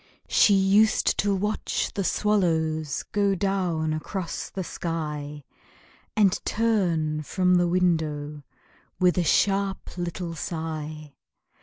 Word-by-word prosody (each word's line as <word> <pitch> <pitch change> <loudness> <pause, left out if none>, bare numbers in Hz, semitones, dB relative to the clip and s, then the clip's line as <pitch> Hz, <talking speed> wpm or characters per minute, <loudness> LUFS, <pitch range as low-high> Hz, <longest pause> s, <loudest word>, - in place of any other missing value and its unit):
She 205 - +5
used 195 +3 +3
to 200 -1 +2
watch 210 +3 -2
the 200 - -2
swallows 160 -8 0
Go 200 -1 +2
down 180 -5 0
across 170 +3 -4
the 190 - -4
sky, 150 -4 -5 0.7
And 205 -3 +3
turn 175 -9 0
from 180 +4 +1
the 175 -1 +4
window 160 -5 0 0.6
With 180 -1 +4
a - - +1 0.8
little 175 0 -4
sharp - - -9
sigh. 155 -3 -5
175 Hz, 110 wpm, -25 LUFS, 155-195 Hz, 0.8 s, She